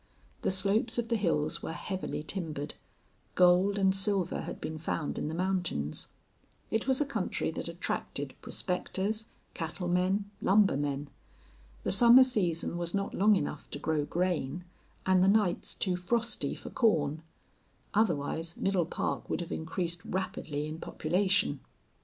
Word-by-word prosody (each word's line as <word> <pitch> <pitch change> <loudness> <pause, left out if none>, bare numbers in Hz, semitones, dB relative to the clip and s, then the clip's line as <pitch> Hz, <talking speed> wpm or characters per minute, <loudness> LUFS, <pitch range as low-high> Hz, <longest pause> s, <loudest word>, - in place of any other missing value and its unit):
The - - +1
slopes 200 +5 +2
of 235 -1 -1
the 235 - +2
hills 160 -7 0
were - - -4
heavily 185 -3 -4
timbered; 155 -5 -3 0.6
gold 185 +3 +5
and 190 -1 +4
silver 195 -1 +1
had - - -6
been 155 0 -5
found 160 -1 -2
in - - -2
the 160 - -3
mountains. 175 - 0 0.6
It 220 +3 0
was 265 -1 +3
a - - +3
country 280 - -2
that - - -4
attracted - - -3
prospectors, 200 +3 -2 0.3
cattlemen, 180 +4 -1
lumbermen. 145 -8 +2 0.7
The - - 0
summer 240 +5 +8
season 175 -8 0
was 170 +1 -1
not 195 0 -1
long 210 +2 +5
enough 150 - -3
to - - -5
grow 155 0 0
grain, 175 -2 -1 0.4
and 185 -1 +4
the - - +4
nights 200 -3 +2
too 185 -2 0
frosty 215 -3 -1
for - - -9
corn; 160 - +2 0.7
otherwise 165 -5 0
Middle 190 -4 +1
Park - - -3
would - - -1
have 170 - -6
increased 170 +2 -3
rapidly 160 -5 -3
in 155 +1 -6
population. 190 +7 +1
180 Hz, 140 wpm, -30 LUFS, 160-200 Hz, 0.7 s, summer